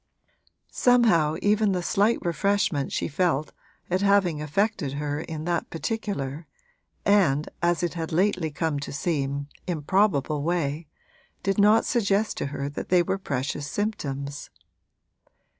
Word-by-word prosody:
Somehow 220 -12 +4
even 210 -1 +3
the 180 -1 -1
slight 205 +6 +2
refreshment 175 -5 0
she - - -1
felt 155 -2 0 0.4
at 185 +2 0
having 195 -6 +3
affected 160 -1 -1
her 145 0 -2
in 155 -1 -6
that 170 -1 -1
particular 165 - -4 0.6
and, 165 -8 +3
as 175 0 +1
it 175 - 0
had 165 -2 -4
lately 180 -1 +1
come 155 -1 -2
to 140 - -6
seem, 140 -2 -2 0.2
improbable 155 -3 +1
way 160 -1 -1 0.6
did 195 +1 0
not 210 +2 +5
suggest 210 -2 +1
to - - -2
her 140 0 -4
that 145 - -6
they 180 -1 +5
were 195 +3 -2
precious 140 -2 -3
symptoms. 145 -9 -3
170 Hz, 130 wpm, -26 LUFS, 145-200 Hz, 0.6 s, not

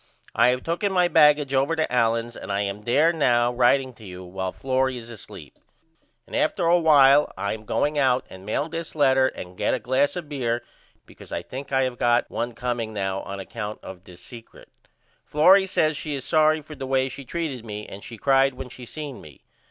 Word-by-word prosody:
I 120 - +4
have 125 +1 +1
tooken 170 +4 -1
my 180 -2 +3
baggage 150 -4 +4
over 135 +4 +2
to 155 -5 -1
Allen's 115 0 +1
and - - -7
I 100 0 0
am 100 +1 -4
there 145 +10 +3
now 120 -6 +2
writeing 130 +2 +2
to 115 - -17
you 90 -2 -9
while 95 +1 -4
Florrie 130 +1 -1
is 120 -1 -10
asleep. 110 - -12 0.7
And - - -8
after - - 0
a 175 +1 +4
while 145 -3 +5
I 100 - -2
am 110 0 -9
going 145 +6 0
out 130 -2 +2
and 95 0 -12
mail 110 +9 -2
this 165 0 -6
letter 135 -3 +4
and 90 -7 -8
get - - 0
a - - -4
glass 130 +5 +1
of 175 -4 -6
beer 120 -5 -2 0.4
because - - -15
I - - -3
think 135 +2 -8
I 135 -1 +2
have 125 -2 -3
got 120 0 +2
1 120 +1 -3
comeing 120 -2 -3
now 95 -1 -2
on 100 0 -7
account 105 +2 -6
of 95 -1 -10
this 90 -2 -15
secret. 115 -2 -13 0.5
Florrie 190 +6 +5
says 155 -4 +1
she 150 0 -4
is 135 - -6
sorry 155 -1 +3
for 155 +1 -11
the 135 -3 -7
way 130 0 +1
she 135 +1 -8
treated 140 -4 -4
me 105 -2 -7
and 100 - -10
she 115 - -9
cried 135 +2 +3
when 130 0 -8
she 125 0 -11
seen 150 -2 -7
me. 75 -3 -15
130 Hz, 215 wpm, -24 LUFS, 115-150 Hz, 0.7 s, while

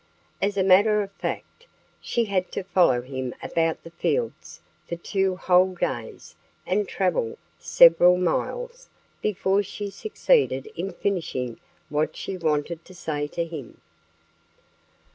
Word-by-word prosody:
As 200 0 0
a 190 - +3
matter 205 +3 +5
of 195 - -9
fact, 475 - -6 0.3
she 235 -1 0
had 190 -3 -1
to - - -3
follow 175 -10 +3
him 130 -1 -5
about 165 -1 0
the 165 - -11
fields 115 - -2 0.3
for - - -2
two 190 +2 -1
whole 185 0 +3
days - - -4 0.3
and 420 - 0
travel 460 -2 -1 0.2
several 180 - +6
miles - - -2 0.3
before 200 -1 +1
she 205 +1 -6
succeeded 440 - +1
in 195 - -3
finishing 135 - -3 0.3
what 150 +1 0
she 195 - -5
wanted 160 0 -1
to 185 - -14
say 150 -4 -3
to 170 +3 -3
him. 155 -7 -9
185 Hz, 130 wpm, -25 LUFS, 160-200 Hz, 0.3 s, several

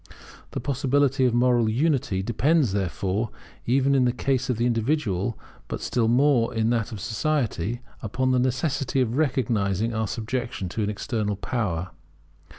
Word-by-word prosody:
The - - -4
possibility 135 0 +1
of 125 - +2
moral 120 -2 +3
unity 125 -6 +1
depends, 130 - +2
therefore, 100 +3 -1 0.4
even 135 +3 +3
in 130 -2 +4
the 120 - +3
case 130 +1 -1
of 125 - 0
the 120 - +1
individual, 115 - 0 0.3
but - - -4
still 115 -2 0
more 125 0 +3
in 115 +1 +2
that 115 -2 0
of 110 - -6
society, 120 - -1 0.2
upon 130 +4 0
the 130 - +3
necessity 130 +2 0
of 120 -1 0
recognizing 115 - 0
our 110 -1 -1
subjection 115 -3 -3
to 110 - -3
an 105 - 0
external 105 -1 -2
power. 95 -5 -2
120 Hz, 155 wpm, -25 LUFS, 105-130 Hz, 0.4 s, in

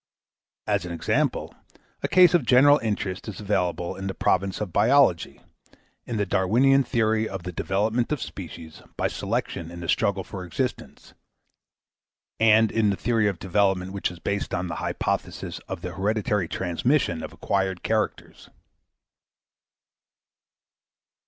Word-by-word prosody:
As 100 -3 0
an 90 - -6
example, 85 - -1 0.5
a - - 0
case 180 -2 +6
of 175 -5 +4
general 135 +4 +6
interest 105 -4 -3
is 105 -5 -6
available 90 -4 -1
in 95 0 -5
the 95 - -4
province 95 +1 0
of 100 -6 -4
biology, 130 - +3 0.7
in 120 - -3
the 105 - +1
Darwinian 120 +9 +3
theory 110 -2 +1
of 95 -3 -6
the 90 - -5
development 110 - -1
of 150 - 0
species 80 -3 -8 0.2
by - - +1
selection 85 -1 -3
in 85 0 -9
the 85 - -6
struggle 100 +1 +1
for 95 0 -7
existence, 85 -4 -5 1.3
and 110 -1 +5
in 110 -2 +2
the 100 - +1
theory 115 +2 +1
of 100 -3 -1
development 95 0 0
which 100 - -1
is 90 - -10
based 100 +2 -2
on 90 +1 -2
the 85 - -4
hypothesis - - -3
of - - -5
the - - -5
hereditary 105 -2 0
transmission 95 - 0
of - - -7
acquired 95 -2 -2
characters. 110 -1 -2
100 Hz, 140 wpm, -25 LUFS, 90-110 Hz, 1.3 s, case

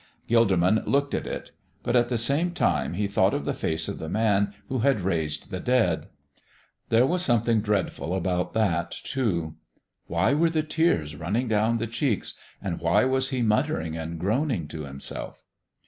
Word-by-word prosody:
Gilderman 110 -3 +3
looked 140 0 +1
at - - -2
it, - - -6 0.3
but 120 - 0
at 120 -1 +3
the 120 - 0
same 145 +9 +1
time 85 - +1
he 100 +2 0
thought 100 - +2
of - - -3
the - - 0
face 80 0 -1
of - - -5
the 80 - -5
Man 100 -1 +2 0.2
who 130 -1 -2
had 130 -3 +2
raised 80 -5 -2
the 95 - -3
dead; 115 -9 +1 0.8
there 115 +2 +5
was 175 +5 0
something 115 -6 +2
dreadful 100 -4 -1
about 90 -1 -1
that, 85 -6 +1
too. 85 -12 -2 0.5
Why 95 +10 +2
were 165 +3 +3
the 160 -1 0
tears 150 - +1
running 100 - -1
down 110 +1 +2
the 115 - -2
cheeks, 115 - -1 0.3
and 95 -4 -4
why 85 +9 +3
was 130 0 +1
He 130 -3 -1
muttering 80 -7 0
and 80 0 -5
groaning 110 - 0
to 75 -2 -6
Himself? 70 0 -6
105 Hz, 175 wpm, -26 LUFS, 85-125 Hz, 0.8 s, there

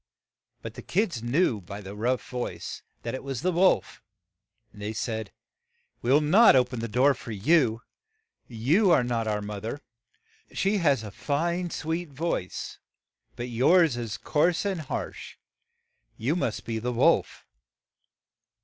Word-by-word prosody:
But - - -6
the - - -9
kids 180 - -1
knew 120 - +1
by 100 +3 -8
the 100 -1 -8
rough 120 +4 -1
voice 125 -1 -5 0.2
that 115 - -4
it 130 - -5
was 135 0 -5
the 185 - +2
wolf, 175 - +2 0.7
and 105 - -13
they 105 +1 -3
said, 110 -2 -3 0.7
"We 120 - 0
will 145 +3 +6
not 185 +6 +6
o 125 -1 +5
pen 125 -1 -6
the 115 - -3
door 130 +6 +3
for 115 - -9
you. 115 - +2 0.6
You 140 - +2
are 155 -7 +5
not 115 -2 -1
our 105 -1 -1
moth 105 -1 -6
er; 140 +6 -4 0.7
she 200 +2 +1
has 145 - +2
a 105 - -7
fine, 170 - -1
sweet 165 +1 -3
voice, 140 - -4 0.6
but 120 +1 -5
yours 145 +5 +4
is 120 -2 -4
coarse 165 +5 +1
and 190 -5 -1
harsh; 150 - -6 0.8
you 130 +9 0
must 120 -11 -2
be 115 -1 -2
the 125 +3 -2
wolf. 120 - +2
125 Hz, 155 wpm, -27 LUFS, 115-165 Hz, 0.8 s, will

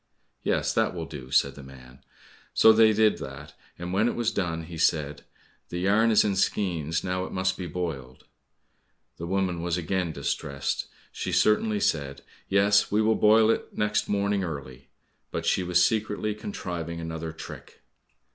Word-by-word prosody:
"Yes, - - 0
that - - +1
will 85 -2 -4
do," 70 -5 -9
said 70 +1 +3
the 70 - -11
man. 65 -1 -14 0.6
So 110 - +7
they 110 0 +6
did 110 0 +3
that, - - -9 0.2
and 90 +1 -5
when 105 +4 +3
it - - -1
was 115 -1 0
done, 85 -6 -2
he 80 0 -8
said, 75 -3 +1 0.5
"The 85 - -4
yarn 105 +5 +3
is 110 - +5
in 100 -2 0
skeins, 85 -5 0
now 90 0 -1
it - - -9
must 95 0 0
be 90 -2 -5
boiled." 75 -7 -5 0.9
The 85 - -6
woman 95 -2 -1
was 85 0 -1
again 90 0 -1
distressed; 70 -1 -3 0.2
She - - -4
certainly 105 0 +2
said, 70 -6 -1 0.3
"Yes, 100 +1 +3
we 105 - +2
will 110 +1 +3
boil 110 +1 +5
it - - -4
next 105 0 0
morning 100 -1 0
early." 70 -5 -7 0.4
but - - -4
she - - +2
was 90 0 +3
secretly 110 -1 -1
contriving 85 -5 -5
another 80 -1 -5
trick. 80 - -11
90 Hz, 165 wpm, -26 LUFS, 80-105 Hz, 0.9 s, So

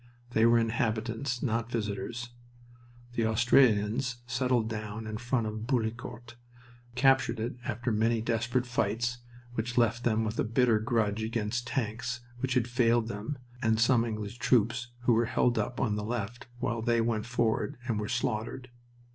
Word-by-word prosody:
They 115 0 +4
were 120 0 +6
inhabitants, 115 +2 -1
not 115 -2 0
visitors. 115 +2 -3 0.8
The 115 -2 +1
Australians 120 +1 +3
settled 125 -2 +1
down 110 0 -5
in 110 0 -4
front 125 0 0
of 110 +1 -4
Bullecourt, 120 -1 -3 0.6
captured 135 -2 +3
it 120 +2 -3
after 120 +3 -2
many 115 +2 +2
desperate 115 +2 0
fights, 120 +1 -1 0.3
which 120 +1 -3
left 115 0 +3
them 110 -1 +2
with 110 +1 -3
a - - +3
bitter 115 0 +3
grudge 110 -2 0
against 115 +2 -2
tanks 115 0 -2 0.2
which 130 0 -1
had 125 -2 +2
failed 120 -2 +2
them 105 +8 -4 0.2
and 110 -1 +2
some 115 0 +4
English 110 0 -4
troops 120 +1 +2
who 120 0 +3
were 115 +1 +3
held 120 +1 +2
up 120 - -2
on 105 -5 +1
the 105 - -3
left 115 +1 -4
while 120 -2 -1
they 115 0 +2
went 115 -1 0
forward 120 +3 0
and 110 -4 0
were 105 - -3
slaughtered. 120 +1 -2
115 Hz, 155 wpm, -30 LUFS, 110-120 Hz, 0.8 s, were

